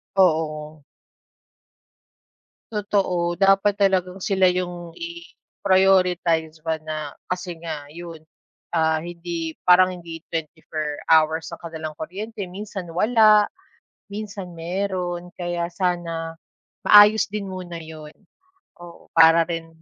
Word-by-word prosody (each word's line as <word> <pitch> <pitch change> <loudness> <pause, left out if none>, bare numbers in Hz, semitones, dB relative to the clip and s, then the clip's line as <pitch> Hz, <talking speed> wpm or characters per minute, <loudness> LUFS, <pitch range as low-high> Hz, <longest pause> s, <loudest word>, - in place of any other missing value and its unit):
Oo. 155 -4 +1 1.9
Totoo, 185 -5 0
dapat 195 +1 +4
talagang 190 -1 +1
sila 190 -1 +3
yung 175 -1 -4
i-prioritize 170 -1 0
ba 160 +1 -1
na 155 -2 -5 0.2
kasi 180 -1 -3
nga 150 -3 -5
yun, 165 +1 -9 0.6
ah, 160 -1 +2
hindi 170 -1 -5
parang, 185 0 +5
hindi 165 -2 -9
24 155 -2 -4
hours 160 0 +3
ang - - -9
kanilang 160 -2 -6
kuryente, 200 +7 -6
minsan 190 -1 -7
wala, 215 +2 +5 0.6
minsan 200 -3 -6
meron. 180 0 -3
Kaya 175 -1 -2
sana 170 -3 -2 0.5
maayos 210 0 +7
din 205 -1 -4
muna 180 -2 -6
yun. 155 -2 -10 0.7
Oo, 175 -1 -14
para 165 0 +6
rin 165 -1 -5
175 Hz, 105 wpm, -23 LUFS, 165-190 Hz, 1.9 s, maayos